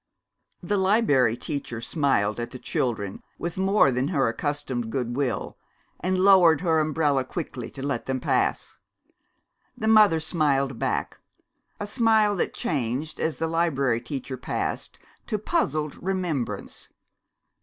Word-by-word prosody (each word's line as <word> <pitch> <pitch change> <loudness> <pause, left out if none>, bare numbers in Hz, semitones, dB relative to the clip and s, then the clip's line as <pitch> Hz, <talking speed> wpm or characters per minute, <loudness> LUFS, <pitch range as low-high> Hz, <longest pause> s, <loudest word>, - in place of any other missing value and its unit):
The 205 +4 0
Liberry 185 - +3
Teacher 140 -5 -4
smiled 115 -5 0
at 120 0 -3
the 130 - -8
children 110 -6 -2 0.2
with 170 -1 -4
more 190 -5 +3
than 125 +2 0
her 140 -7 +1
accustomed 130 -2 -3
goodwill, 125 +1 -2 0.4
and 185 +1 0
lowered 185 -5 +6
her 165 -3 +2
umbrella 150 -3 +1
quickly 130 -4 -6
to 135 - -8
let 140 - -2
them 130 -1 -1
pass. - - -1 1.0
The 220 - -2
mother 215 -6 +6
smiled 140 -5 0
back, - - -2 0.6
a 205 - -3
smile 220 -2 +3
that - - 0
changed, 140 +1 -2
as 160 -1 -1
the 165 - -2
Liberry 140 -8 +1
Teacher 130 +1 -5
passed, 125 - -3 0.3
to 215 - -1
puzzled 155 - -1
remembrance. 180 -9 -3
145 Hz, 130 wpm, -25 LUFS, 130-180 Hz, 1.0 s, lowered